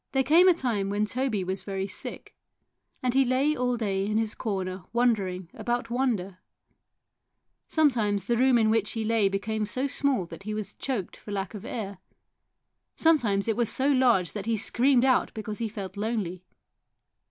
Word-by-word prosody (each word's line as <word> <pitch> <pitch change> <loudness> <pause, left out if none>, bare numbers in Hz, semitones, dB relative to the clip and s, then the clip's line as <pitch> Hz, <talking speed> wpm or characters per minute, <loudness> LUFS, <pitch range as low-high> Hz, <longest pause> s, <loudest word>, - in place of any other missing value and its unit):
There 265 0 +3
came 325 +7 +6
a 365 - +7
time 225 -10 -1
when 205 +1 +1
Toby 230 -3 -1
was 190 +1 -3
very 195 0 -3
sick, 195 - -7 0.7
and 250 -1 +1
he 270 +1 +5
lay 265 +4 +2
all 250 -2 0
day 195 -4 -1
in 215 +1 0
his 220 -1 0
corner 190 -4 -3
wonder 235 -5 +2
ing 180 -1 -7
about 240 -1 -3
wonder. 215 -8 -1 1.3
Sometimes 225 - +2
the 235 - +1
room 255 +1 +4
in 220 -1 +3
which 220 -2 +1
he 225 -1 -2
lay 220 -3 +2
became 210 +2 -2
so 255 +5 -1
small 275 -7 0
that 170 +1 -10
he 215 +2 -4
was 215 -1 -5
choked 240 -10 -3
for - - -14
lack 200 0 -3
of 210 0 -8
air, 200 -6 -5 1.0
sometimes 230 -12 +2
it 225 - +1
was 235 -1 +1
so 270 +2 +1
large 245 -10 +3
that 205 0 -6
he 230 -1 +1
screamed 250 +4 +3
out 260 -1 +3
because 215 -1 -5
he 230 -1 -2
felt 195 -3 -7
lonely. 205 -4 -3
220 Hz, 180 wpm, -27 LUFS, 195-250 Hz, 1.3 s, a